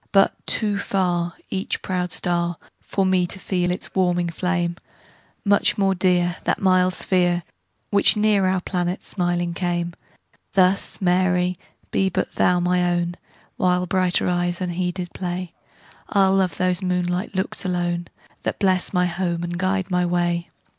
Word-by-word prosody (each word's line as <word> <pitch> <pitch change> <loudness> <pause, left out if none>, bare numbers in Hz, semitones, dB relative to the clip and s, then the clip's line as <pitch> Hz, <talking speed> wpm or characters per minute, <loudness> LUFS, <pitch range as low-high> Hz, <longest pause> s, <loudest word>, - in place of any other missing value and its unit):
But 195 -1 +4
too 210 -2 +1
farEach 180 -1 -2
proud 180 -2 -2
star, 175 0 0 0.2
For 195 - -1
me 185 -1 +2
to 190 - -3
feel 180 -2 -1
its 180 - -4
warming 175 -2 +1
flame; 175 -1 -1 0.7
Much 200 0 +3
more 195 -1 +3
dear, 180 -1 +2
That - - 0
mild 185 -1 +3
sphere, 175 -2 +2 0.5
Which 205 +1 +5
near 210 -2 +3
our 185 -1 +1
planet 180 0 -2
smiling 175 -2 -1
came; 175 -1 -2 0.6
Thus, 190 0 +2
Mary, 180 -1 +2 0.3
be 190 - +2
but - - -2
thou 180 0 +2
my 180 0 +2
own; 175 0 0 0.4
While 180 0 +2
brighter 185 0 +2
eyes 175 -1 0
unheeded 180 0 -3
play, 180 -1 -4 0.6
I'll 195 -2 +3
love 185 -5 +1
those 180 0 +1
moonlight 180 +2 -1
looks 190 +1 -1
alone, 175 -2 -1 0.3
That - - -2
bless 190 -2 +1
my 180 -1 +3
home 175 -1 -2
and 175 0 -3
guide 190 +1 -1
my 180 0 +2
way. 175 -1 0
180 Hz, 145 wpm, -22 LUFS, 175-185 Hz, 0.7 s, Which